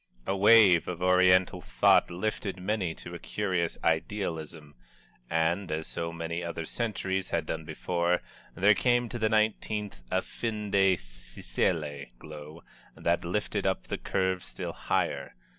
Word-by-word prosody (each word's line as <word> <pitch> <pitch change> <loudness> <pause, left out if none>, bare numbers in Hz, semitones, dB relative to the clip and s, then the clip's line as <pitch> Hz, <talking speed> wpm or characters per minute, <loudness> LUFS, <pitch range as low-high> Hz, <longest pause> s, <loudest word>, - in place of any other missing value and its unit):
A 95 - 0
wave 100 -3 +6
of 90 0 -4
Oriental 90 0 +4
thought - - +3
lifted 95 +1 -3
many 95 -3 -1
to - - -10
a - - -6
curious 90 -5 -2
idealism 80 -3 -2 0.6
and, 85 +4 0
as 80 +1 -2
so 85 0 -3
many 85 +1 -4
other 85 -1 -4
centuries 95 -3 -2
had - - -1
done 80 -1 -4
before, 85 +2 -1 0.3
there 105 +3 +5
came 120 +2 +2
to 120 - -5
the 110 0 +2
nineteenth 110 - 0
a - - 0
fin 105 -3 -4
de 95 -1 +4
siècle 70 +5 -3
glow 75 +2 -10 0.3
that 85 +1 0
lifted 100 +3 -1
up 95 - 0
the - - -4
curve 95 -1 -1
still - - -5
higher. - - -2
90 Hz, 140 wpm, -29 LUFS, 85-105 Hz, 0.6 s, wave